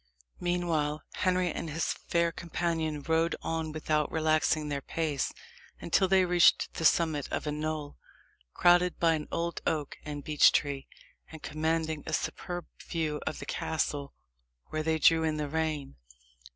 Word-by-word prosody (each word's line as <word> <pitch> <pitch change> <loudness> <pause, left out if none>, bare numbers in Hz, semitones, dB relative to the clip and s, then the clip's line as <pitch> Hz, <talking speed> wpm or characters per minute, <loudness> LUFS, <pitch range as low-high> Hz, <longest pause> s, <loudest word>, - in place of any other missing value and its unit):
Meanwhile, 165 -4 0
Henry 185 -1 +1
and 165 - -4
his 160 +3 -1
fair 170 0 0
companion 165 -3 -2
rode 165 0 +1
on 160 -1 -2
without 155 -1 0
relaxing 155 -1 +2
their 140 -1 -2
pace, 155 -2 -1 0.5
until 190 - +2
they 190 0 +4
reached 175 -1 +4
the 165 - -3
summit 155 -4 +3
of - - -3
a 150 - -1
knoll, 150 -1 -4 0.6
crowned 175 0 +4
by 165 -1 +4
an 155 -1 -3
old 170 0 -2
oak 150 -3 -2
and 145 -1 -6
beech 150 0 +5
tree, 140 -2 -1 0.4
and 160 -1 -11
commanding 160 0 -1
a - - -3
superb 175 -1 -3 0.2
view 155 -3 -2
of 155 - -2
the - - -7
castle, 145 -3 -2 0.5
where 155 - -2
they 160 0 +1
drew 165 +1 +5
in 155 -1 0
the 150 -1 -2
rein. 155 - -2
160 Hz, 150 wpm, -30 LUFS, 150-170 Hz, 0.6 s, beech